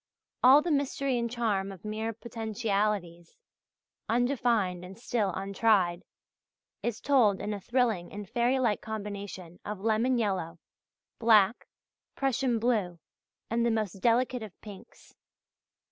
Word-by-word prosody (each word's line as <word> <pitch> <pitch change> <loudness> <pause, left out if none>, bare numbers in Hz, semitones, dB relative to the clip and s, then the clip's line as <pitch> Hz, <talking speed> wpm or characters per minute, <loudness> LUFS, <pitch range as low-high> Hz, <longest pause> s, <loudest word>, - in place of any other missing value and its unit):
All 270 +4 +8
the 345 - -1
mystery 275 -2 0
and 235 0 -1
charm 215 -5 -1
of 190 0 -12
mere 220 +1 -2
potentialities, 210 -6 -3 0.7
undefined 235 -7 +1
and 190 +2 -10
still 230 -3 -1
untried, 195 -2 +2 0.8
is 235 -2 -2
told 240 -9 +3
in 210 - -3
a 200 - -6
thrilling 230 -7 0
and 205 0 -7
fairy 240 +4 +1
like 235 -5 +1
combination 200 -5 -7
of 210 -1 -5
lemon 225 +4 +1
yellow, 190 -7 -1 0.6
black, 220 -1 +4 0.5
Prussian 265 -2 +1
blue, 215 -7 0 0.5
and 235 0 +1
the 235 - +3
most 215 -4 -2
delicate 245 +1 +2
of 215 -4 -10
pinks. 205 -3 -13
220 Hz, 125 wpm, -29 LUFS, 195-240 Hz, 0.8 s, All